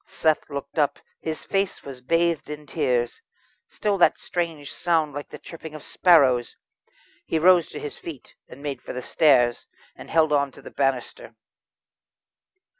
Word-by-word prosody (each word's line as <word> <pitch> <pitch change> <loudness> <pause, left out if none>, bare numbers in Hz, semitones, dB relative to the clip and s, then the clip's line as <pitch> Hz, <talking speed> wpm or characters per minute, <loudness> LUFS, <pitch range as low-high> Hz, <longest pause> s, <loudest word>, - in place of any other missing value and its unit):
Seth 155 -1 0
looked 140 +2 -5
up; 145 -2 +2 0.2
his 160 -1 -5
face 195 -1 -1
was 135 -2 -9
bathed 165 +3 +1
in 150 0 -7
tears. 120 -3 -1 0.5
Still 205 -2 -1
that - - +5
strange 165 -5 -4
sound 160 -4 +1
like 145 +1 -6
the - - -9
chirping 160 -2 -10
of 155 - -9
sparrows. 135 -9 +4 0.7
He 165 - 0
rose 175 0 +5
to - - -8
his 145 - -7
feet 155 -6 -9 0.2
and 140 - -12
made 145 -2 -4
for - - -7
the 125 - -5
stairs, 125 -6 +3 0.3
and - - -12
held 160 -2 +3
on 140 -1 +2
to - - -14
the - - -10
banister. 135 - -2
150 Hz, 160 wpm, -24 LUFS, 140-165 Hz, 0.7 s, that